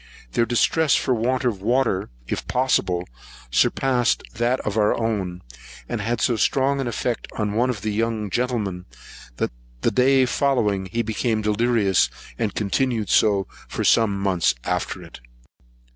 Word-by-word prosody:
Their 115 - +1
distress 140 +5 +3
for 130 - +1
want 125 +3 0
of 105 -6 0
water, 115 -3 +1 0.2
if - - -4
possible, 90 -9 +1 0.4
surpassed 125 - +2
that 120 +3 0
of 105 - -3
our 105 -1 +2
own, 100 -6 -2 0.4
and - - -3
had 115 0 -1
so 120 - +2
strong 135 +3 +2
an 130 - -2
effect 120 0 -2
on 105 -2 -1
one 120 +4 +2
of 115 -6 -3
the 110 +1 -2
young 110 -1 -1
gentlemen, 105 -7 -2 0.5
that - - -1 0.3
the - - +2
day 130 +1 +4
following 110 -8 +1
he 115 +5 -1
became 110 0 -1
delirious, 105 -2 +2 0.3
and 110 -4 -1
continued 110 +1 0
so 100 -3 +3 0.2
for - - -3
some 105 -4 +3
months 95 -8 +1
after - - -2
it. - - -12
115 Hz, 150 wpm, -23 LUFS, 100-125 Hz, 0.5 s, day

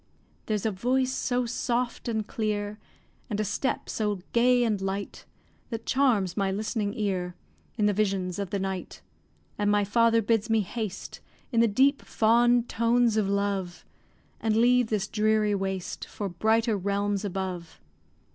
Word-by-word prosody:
There's 215 -2 -1
a 220 - +2
voice 255 +6 0
so 250 -1 0
soft 240 +1 -2
and 220 -2 -1
clear, 210 -1 -3 0.5
And 210 -2 -2
a - - +2
step 260 +6 -2
so 210 -2 -1 0.2
gay 245 +1 +4
and 215 -4 0
light, 195 +1 -4 0.4
That 225 -1 -5
charms 235 -10 +2
my 195 -2 0
listening 210 +1 -2
ear 185 -4 -2 0.4
In 210 - +2
the 205 - +3
visions 190 -3 -1
of 200 -2 -3
the 200 - -1
night. 190 -1 -5 0.6
And 205 0 +2
my 205 0 +3
father 230 +2 +3
bids 225 +1 +1
me 225 -1 +3
haste, 210 -1 -5 0.3
In 230 - +2
the 230 - +5
deep, 270 +7 +3
fond 240 +2 +3
tones 235 0 +2
of 210 -3 +1
love, 200 -3 -2 0.5
And 220 -1 +1
leave 245 +1 +4
this 215 -2 -1
dreary 215 -1 +2
waste, 190 -2 -3
For 205 - -5
brighter 220 +5 +1
realms 200 +1 -1
above. 185 -4 -4
215 Hz, 155 wpm, -27 LUFS, 200-230 Hz, 0.6 s, the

